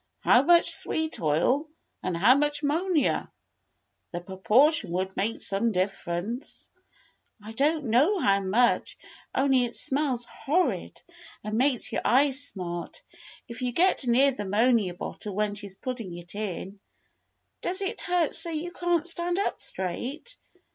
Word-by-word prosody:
How 245 - +5
much 340 +4 +4
sweet 315 0 -2
oil 175 - +1 0.3
and 180 -2 -2
how 220 +9 +6
much 295 +1 0
'monia? 315 0 +1 0.8
The 175 - -4
proportion 210 - +2
would 185 +2 -2
make 220 +4 -2
some 205 +4 0
differ 185 -2 -2
ence." 235 +10 -7 0.7
"I 215 - -8
don't 295 +6 +1
know 270 - +3
how 200 - +3
much, 210 +6 +1 0.4
only 265 -2 +3
it 235 - -6
smells 265 -4 -1
horrid 320 +8 -1 0.4
and 215 +1 -3
makes 255 +1 +1
your - - -1
eyes 270 +2 +3
smart, 175 -6 -6 0.4
if 235 +2 -9
you 250 -1 -1
get 345 -4 +2
near 265 +4 +4
the 250 -5 -5
'monia 210 -2 +2
bottle 200 +2 -6
when 210 0 0
she's 200 -2 -7
putting 225 -7 -6
it 175 0 -9
in. 200 -1 -5 0.8
Does 375 +2 -1
it 405 +4 -3
hurt 350 -3 +1
so 340 - +1
you 330 +2 -4
can't 350 -2 0
stand 345 +1 0
up 400 - -1
straight. 260 - -4
245 Hz, 145 wpm, -27 LUFS, 200-300 Hz, 0.8 s, how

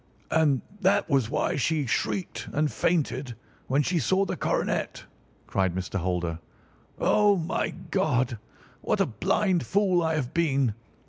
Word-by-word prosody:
"And 150 -5 +3 0.2
that 200 +1 +2
was 135 -5 +2
why - - 0
she 150 +2 +1
shrieked 180 - -2
and 150 0 +1
fainted 135 -7 0 0.3
when 140 +3 +2
she 175 +3 +1
saw 190 +8 +2
the - - -3
coronet," - - -1 0.4
cried 95 -2 0
Mr. 95 +1 -3
Holder. 85 -2 -2 0.6
"Oh, 205 -1 +4
my 165 +1 -1 0.2
God! 130 - +1 0.4
what - - 0
a - - +4
blind 185 - +1
fool 190 - +2
I 160 -1 +1
have 130 -5 -3
been! 140 -8 +2
150 Hz, 140 wpm, -27 LUFS, 120-180 Hz, 0.6 s, Oh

